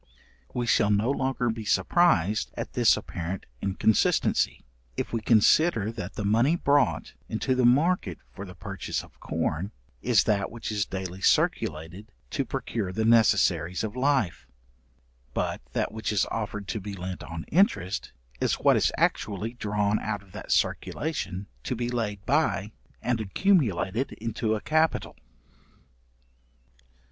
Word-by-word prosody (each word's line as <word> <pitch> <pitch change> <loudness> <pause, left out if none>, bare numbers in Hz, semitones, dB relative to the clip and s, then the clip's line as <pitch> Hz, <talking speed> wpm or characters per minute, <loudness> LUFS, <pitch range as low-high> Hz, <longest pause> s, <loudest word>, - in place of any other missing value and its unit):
We 120 - -2
shall 105 -3 +3
no 105 +5 +2
longer 130 -3 0
be 110 0 -6
surprised 105 - +2
at - - -5
this - - +4
apparent 85 +2 -5 0.2
inconsistency, 100 +2 +1 0.3
if - - -3
we 115 - 0
consider 110 - +4
that 95 -5 -7
the 105 - -3
money 115 +10 +3
brought 145 -4 +1 0.2
into 120 +4 0
the 125 -1 +4
market 140 - +2 0.2
for - - -7
the - - -10
purchase - - -4
of - - -19
corn, 85 +7 -2 0.3
is - - +4
that 100 -2 +1
which 115 -1 -6
is 105 -2 0
daily 95 -1 -5
circulated 90 +6 0 0.2
to - - 0
procure 100 -6 -3
the 110 +4 -1
necessaries 110 -6 +3
of 110 +1 -4
life; 130 - 0 0.9
but - - -1
that - - 0
which 110 -2 -3
is 105 - +2
offered 105 -2 -4
to 110 - -2
be 100 +1 -6
lent 90 0 -6
on 85 -1 -6
interest, 105 - +1 0.3
is - - +1
what - - +4
is - - +3
actually 105 +3 0
drawn 105 -2 0
out 105 - -3
of 95 - -20
that - - -7
circulation 125 - -1 0.2
to 125 - -2
be 120 +1 -2
laid 105 -5 -3
by 100 +2 +1 0.3
and 120 -2 0
accumulated 115 - +1
into 110 0 -2
a 105 - -4
capital. 155 +4 +1
110 Hz, 145 wpm, -27 LUFS, 95-120 Hz, 0.9 s, this